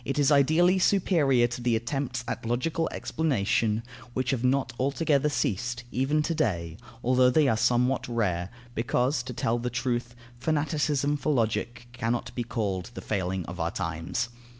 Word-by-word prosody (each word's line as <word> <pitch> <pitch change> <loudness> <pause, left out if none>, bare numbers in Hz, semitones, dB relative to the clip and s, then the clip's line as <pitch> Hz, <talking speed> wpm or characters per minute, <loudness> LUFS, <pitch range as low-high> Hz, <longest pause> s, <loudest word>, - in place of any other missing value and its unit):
It 135 +4 -3
is 145 0 +3
ideally 160 +6 +4
superior 160 -10 +3
to 120 +1 -4
the 120 -1 +2
attempts 125 +1 -2
at - - -4
logical 130 +8 -1
explanation, 115 -6 0 0.3
which 130 -1 0
have 130 -3 -1
not 135 +2 +1
altogether 140 +2 +2
ceased, 120 -1 -1
even 140 +5 +1
to 165 - -1
day, 85 - -1 0.3
although 125 +1 +4
they 150 +2 +4
are 115 - +3
somewhat 125 +3 +2
rare, 95 -7 -1 0.2
because, 125 +4 +1
to 125 0 -7
tell 115 0 0
the 125 +1 -2
truth, 120 0 -2 0.2
fanaticism 150 -1 0
for 150 +2 -1
Logic 120 -1 -1
cannot 120 -1 -2
be 120 - -2
called 105 -5 -2
the - - -6
failing 95 -3 -2
of 90 +1 -8
our 85 0 0
times. 85 +7 -3
125 Hz, 160 wpm, -27 LUFS, 115-140 Hz, 0.3 s, ideally